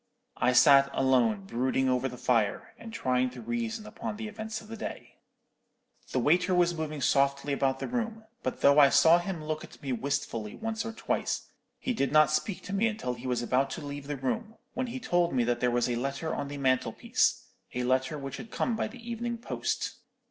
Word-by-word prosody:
I 125 - +3
sat 140 +1 +7
alone 120 -7 +2
brooding 130 +5 0
over 130 0 +1
the 125 - -9
fire, 115 -5 0
and 230 - -9
trying 130 - +1
to 125 0 -11
reason 230 - -3
upon 210 - -6
the 220 0 -5
events 220 0 -5
of 215 - -14
the 225 - -7
day. - - -7 0.9
"The - - -1
waiter 180 +8 +3
was 175 -1 +3
moving 155 -3 -4
softly 140 +2 +2
about 135 -1 +1
the - - -4
room; 230 -2 -3 0.2
but - - -3
though 140 +1 +6
I 140 -1 +8
saw 165 +4 +6
him 175 -3 -4
look 155 0 -3
at - - -13
me 135 -2 -1
wistfully 115 -4 -2
once 225 0 -3
or 225 - -3
twice, 225 - -2 0.3
he 255 - -2
did 140 - 0
not 155 0 +5
speak 180 +6 -1
to 200 - -6
me 205 +3 +3
until 210 - -2
he 125 +1 -7
was 125 -1 0
about 130 +3 +1
to 155 - -7
leave 140 0 -6
the 145 -1 -3
room, 215 - -3 0.2
when 255 +1 -2
he 250 +2 -5
told 175 -8 +1
me 125 - +3
that 120 0 0
there 125 - +2
was 120 0 +1
a 120 - 0
letter 140 +5 -2
on 140 - -3
the 145 0 -6
mantelpiece; 130 -2 +1 0.3
a 125 - 0
letter 130 +3 +1
which 135 -2 -6
had 225 - -9
come 235 +1 -1
by - - -1
the 235 +1 -12
evening 235 0 -3
post. 230 - -3
145 Hz, 215 wpm, -29 LUFS, -, 0.9 s, I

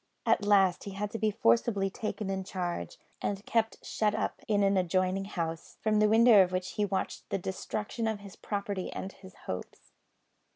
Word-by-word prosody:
At 230 -2 +3
last 195 -3 +4
he 200 - -6
had 205 +1 -3
to 225 - -4
be 220 - +2
forcibly 195 - +2
taken 215 -2 -3
in 190 0 -2
charge, 175 - -4 0.2
and 200 0 -2
kept 225 -1 0
shut 210 -1 0
up - - -2
in 205 -2 +3
an 195 0 +3
adjoining 185 +1 +1
house, 165 -4 -4
from 215 -1 +2
the 210 0 +5
window 225 -1 +7
of 180 - -3
which 185 +1 -2
he 210 - 0
watched 190 -1 -3
the - - 0
destruction 210 +4 -3
of 220 -2 -2
his 200 -2 -11
property 200 -2 -3
and 195 - -5
his 190 -1 -15
hopes. 90 - -7
195 Hz, 190 wpm, -30 LUFS, 185-210 Hz, 0.2 s, window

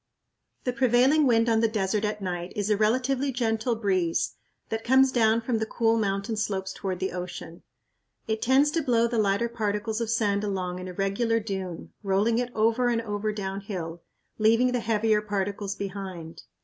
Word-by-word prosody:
The 250 - -1
prevailing 265 +3 +4
wind 230 -1 +3
on 225 -1 +3
the 225 - +3
desert 210 -1 -1
at 210 -1 -3
night 175 -1 -4
is 205 0 -1
a - - +5
relatively 255 +6 +1
gentle 230 -1 0
breeze 185 -6 0 0.4
that 225 0 -3
comes 265 +1 +5
down 225 -2 +3
from 230 -1 -1
the 220 - 0
cool 225 -1 +2
mountain 200 +1 -1
slopes 190 -2 -2
toward 190 -2 -4
the 190 +1 -2
ocean. 175 -2 -7 0.7
It 220 0 -1
tends 270 +4 +4
to 330 - 0
blow 235 -5 +2
the 235 -1 0
lighter 205 +2 +2
particles 220 0 -2
of 230 - -2
sand 210 -3 +1
along 185 -3 -2
in 185 - -6
a 180 - -6
regular 200 +5 0
dune, 190 -5 -5
rolling 210 +3 +1
it 245 0 -2
over 230 +3 +2
and 235 -1 +1
over 210 0 -2
downhill, 190 -4 -5 0.4
leaving 230 +4 +4
the 250 - 0
heavier 220 -1 +1
particles 200 -1 -3
behind. 190 -5 -6
215 Hz, 175 wpm, -26 LUFS, 195-235 Hz, 0.7 s, a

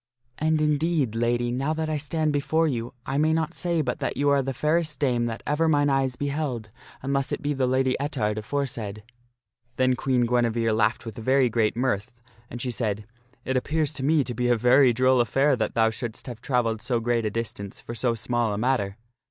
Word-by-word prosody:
And 155 0 +2
indeed, 150 -4 +1
Lady, 120 +1 0
now 135 +5 -1
that 160 0 -2
I 155 -1 -1
stand 155 +1 -1
before 160 +3 +1
you, 120 -3 -3
I 135 +2 -1
may 155 +1 +3
not 160 +1 -1
say 170 -3 0
but 125 - -2
that - - -2
you 145 +1 +2
are 140 -1 +4
the 135 0 -3
fairest 155 +4 0
dame 125 -4 +1
that 115 -1 -5
ever 155 +3 +1
mine 145 -2 +3
eyes 135 -2 +1
beheld 140 -6 -3 0.3
unless 140 0 -1
it - - -1
be 145 +1 0
the 130 -2 0
Lady 130 0 +2
Ettard 115 -7 -1
aforesaid." 110 -4 -3 0.7
Then 130 0 +2
Queen 125 -1 +1
Guinevere 115 -1 +1
laughed 110 +3 +1
with 115 -3 -7
very 130 +2 +3
great 115 -1 +1
mirth. 125 -3 -1 0.4
And 120 - -7
she 125 +1 -2
said, 105 -3 -2 0.2
" 120 - -35
It 130 - -1
appears 155 +3 0
to 135 - -5
me 150 +1 +3
to 125 - -4
be 125 +1 -1
a 120 -1 +3
very 125 +3 +5
droll 130 +2 +3
affair 135 +4 +2
that 110 - -2
thou 110 -1 +3
shouldst 115 0 -6
have 120 -3 -8
trav 125 -2 +1
elled 110 -1 -2
so 120 -3 0
great 115 -1 0
a - - 0
distance 100 -3 -4
for 115 - -8
so 120 0 0
small 115 -1 0
a - - -4
matter." 110 -4 0
130 Hz, 215 wpm, -25 LUFS, 115-145 Hz, 0.7 s, very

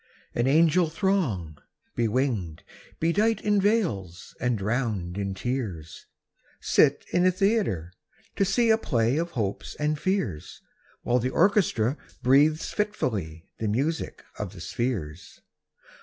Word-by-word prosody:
An 120 +2 +1
angel 165 +3 +4
throng, 140 - -1 0.4
bewinged, 115 - -1 0.4
bedight 205 +7 +2
In 205 -1 +2
veils, 110 - -1
and 120 -1 0
drowned 105 -4 -2
in 100 -1 -3
tears, 100 - -4 0.5
Sit - - +3
in 175 - +3
a 185 - +6
theatre, 185 - 0 0.4
to - - +2
see 230 +4 +3
A 220 - +4
play 120 - +1
of 170 +1 -1
hopes 100 -3 -3
and 150 0 -1
fears, 185 - -2 0.4
While 125 +1 +2
the 125 +2 -1
orchestra 160 - +2 0.3
breathes 145 +5 +3
fitfully 105 - -2
The 110 - -1
music 140 +10 -2 0.2
of 105 -2 -4
the 90 - -10
spheres. 90 -6 -4
125 Hz, 125 wpm, -26 LUFS, -, 0.5 s, a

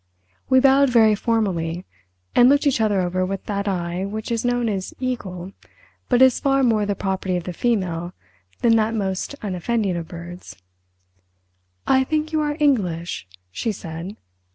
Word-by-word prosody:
We 260 - +6
bowed 270 +1 +5
very 225 -3 +5
formally, 185 -7 -1 0.5
and 245 +1 +6
looked 285 +2 +3
each 270 -5 +2
other 205 -3 +2
over 185 +1 -1
with 195 +1 -4
that 200 0 -2
eye 175 -1 -2
which 215 +3 -5
is 230 -1 0
known 245 -1 +1
as 195 -3 -3
"eagle" 195 -8 -4 0.6
but 250 0 +5
is 260 -2 +5
far 275 -1 +2
more 220 -4 +2
the 205 - 0
property 190 -1 -2
of 175 - -4
the 180 - -5
female 180 -6 -1 0.5
than 230 -1 +5
that 220 +1 +1
most 195 +5 -2
unoffending 200 +1 -1
of 170 -1 -4
birds. 175 +1 -9 1.3
"I 265 0 +4
think 310 +3 -2
you 310 - +2
are 295 0 -1
English?" 180 - 0 0.2
she 225 - -2
said. 175 +1 -7
205 Hz, 160 wpm, -22 LUFS, 180-245 Hz, 1.3 s, We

